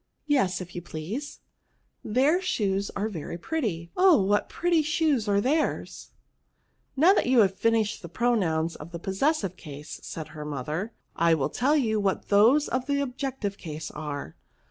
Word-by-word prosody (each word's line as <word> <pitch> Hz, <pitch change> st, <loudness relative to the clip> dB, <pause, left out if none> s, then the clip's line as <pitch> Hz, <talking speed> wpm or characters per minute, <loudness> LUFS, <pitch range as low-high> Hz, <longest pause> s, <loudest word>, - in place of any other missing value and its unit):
" -, -, -49 dB
Yes, 255 Hz, -12 st, +1 dB
if 180 Hz, 0 st, -9 dB
you 175 Hz, -, -5 dB
please." 180 Hz, -, -6 dB, 0.6 s
Hieir 275 Hz, -, +2 dB
shoes 200 Hz, -, 0 dB
are 205 Hz, +2 st, -1 dB
very 170 Hz, -4 st, -6 dB
pretty; 175 Hz, -, -3 dB
oh, 365 Hz, -5 st, +6 dB
what 205 Hz, +1 st, +1 dB
pretty 345 Hz, -2 st, +2 dB
shoes 305 Hz, -7 st, +1 dB
are 200 Hz, -1 st, +3 dB
theirs! 290 Hz, +9 st, -1 dB, 0.3 s
" -, -, -46 dB
" -, -, -44 dB
Now 340 Hz, +8 st, +6 dB
that -, -, +1 dB
you 250 Hz, -2 st, +5 dB
have 195 Hz, -2 st, +3 dB
finished 220 Hz, +1 st, +1 dB
the 170 Hz, -, -9 dB
pro 240 Hz, +8 st, +1 dB
nouns 165 Hz, -6 st, 0 dB
of 165 Hz, +4 st, -11 dB
the -, -, -3 dB
possessive 195 Hz, -, 0 dB
case," 150 Hz, -2 st, -9 dB
said 160 Hz, -2 st, -7 dB
her 155 Hz, -1 st, -8 dB
mo 145 Hz, -4 st, -4 dB
ther, 180 Hz, -, -4 dB, 0.2 s
I 165 Hz, 0 st, +4 dB
will 140 Hz, -4 st, -1 dB
tell 285 Hz, +5 st, +2 dB
you 220 Hz, -6 st, +1 dB
what 195 Hz, -2 st, -1 dB
those 230 Hz, +9 st, +5 dB
of 255 Hz, +1 st, -2 dB
the 285 Hz, 0 st, +1 dB
objective 260 Hz, -6 st, -3 dB
case 155 Hz, -2 st, -6 dB
are. 145 Hz, -, -6 dB
205 Hz, 185 wpm, -27 LUFS, 170-275 Hz, 0.6 s, oh